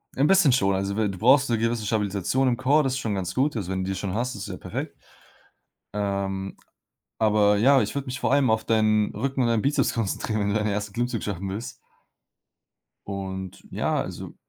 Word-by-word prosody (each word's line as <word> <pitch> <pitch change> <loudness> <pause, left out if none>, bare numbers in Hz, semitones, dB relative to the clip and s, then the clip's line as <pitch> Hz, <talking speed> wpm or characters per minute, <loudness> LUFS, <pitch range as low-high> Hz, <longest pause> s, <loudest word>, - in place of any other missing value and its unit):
Ein 135 - +2
bisschen 190 -7 +5
schon. 100 -6 +2
Also, 100 +1 -2
we 110 -1 +2
du 95 - -7
brauchst 130 +3 +5
'ne 115 - +2
gewisse 115 -1 -1
Stabilisation 105 +4 0
im 120 -2 +1
Core, 145 +6 +3
das 130 -1 0
ist 135 - -2
schon 110 -4 -2
ganz 95 -3 -3
gut. 135 +1 +1
Also, 95 -4 -3
wenn 95 0 -1
du 95 - -4
die - - -2
schon 95 0 -3
hast, 125 +4 -1
das 100 - -6
ist - - -6
ja - - -5
perfekt. - - -6 1.0
Ähm, 100 -1 -3 0.6
aber 105 -1 +3
ja, 135 +5 +5
ich - - -3
würde 140 0 -2
mich 130 +1 -5
vor - - 0
allem 140 -4 +3
auf 110 0 0
deinen 110 -1 +2
Rücken 135 +4 -1
und 120 - +2
deinen 115 -2 +2
Bizeps 145 +2 +1
konzentrieren, 110 0 -2
wenn 100 - 0
du - - 0
deinen 105 0 +1
1. 105 -1 -3
Klimmzug 120 -1 -2
schaffen 100 -1 -4
willst. 105 +5 -5 1.3
Und 95 -1 -6
ja, - - 0
also, - - -7
110 Hz, 215 wpm, -25 LUFS, 100-125 Hz, 1.3 s, bisschen